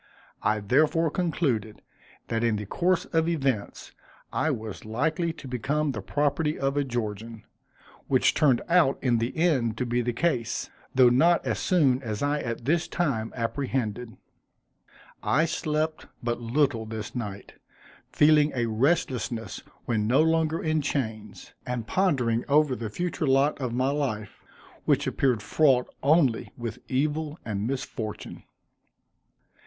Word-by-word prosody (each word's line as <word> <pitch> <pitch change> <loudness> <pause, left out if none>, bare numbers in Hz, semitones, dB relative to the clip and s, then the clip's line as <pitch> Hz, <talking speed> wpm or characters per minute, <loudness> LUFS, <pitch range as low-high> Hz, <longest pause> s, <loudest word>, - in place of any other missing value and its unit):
I 110 0 +1
therefore 155 +8 +2
concluded, 140 - -1 0.5
that 115 0 0
in 115 -2 +2
the 105 0 -4
course 180 - +1
of 165 0 +2
events, 135 -10 -2 0.4
I 160 - +1
was 110 -7 -4
likely 160 +10 -1
to 150 - -11
become 140 +4 -1
the 110 -4 -5
property 145 +6 0
of 135 +1 -1
a 145 - +2
Georgian, 115 -3 -4 0.6
which - - +3
turned 140 -6 +3
out 170 -6 +4
in 120 -3 +2
the 120 +7 -3
end 130 -10 +2
to 125 - -1
be 120 0 0
the 120 +1 -1
case, 120 -3 -1 0.2
though 130 -2 +7
not 165 +8 +3
so - - +1
soon 140 -8 +2
as 110 -1 -4
I 145 +1 +1
at 115 -3 -4
this 160 +4 +1
time 130 -10 -1
apprehended. 120 -1 -3 1.0
I 155 +5 +2
slept 155 -1 -2 0.2
but 120 0 -2
little 120 -1 0
this 110 -1 -6
night, 105 -5 -6 0.6
feeling 150 0 +5
a 120 -2 +1
restlessness 120 - -1 0.2
when 110 -3 0
no 135 +7 +4
longer 160 0 +1
in 155 -1 +1
chains; 110 -8 -4
and 125 -2 -3
pondering 125 - +1
over 145 -2 +4
the 115 -3 -5
future 170 +4 -2
lot 135 +2 +2
of 125 -2 -2
my 130 +3 +1
life, 125 -8 -3 0.4
which - - +2
appeared 125 -6 +1
fraught 130 +1 +3 0.2
only 140 -5 +2
with 115 -3 -5
evil 150 +3 -1
and 105 -1 -2
misfortune. 125 -5 -5
130 Hz, 140 wpm, -26 LUFS, 115-155 Hz, 1.0 s, though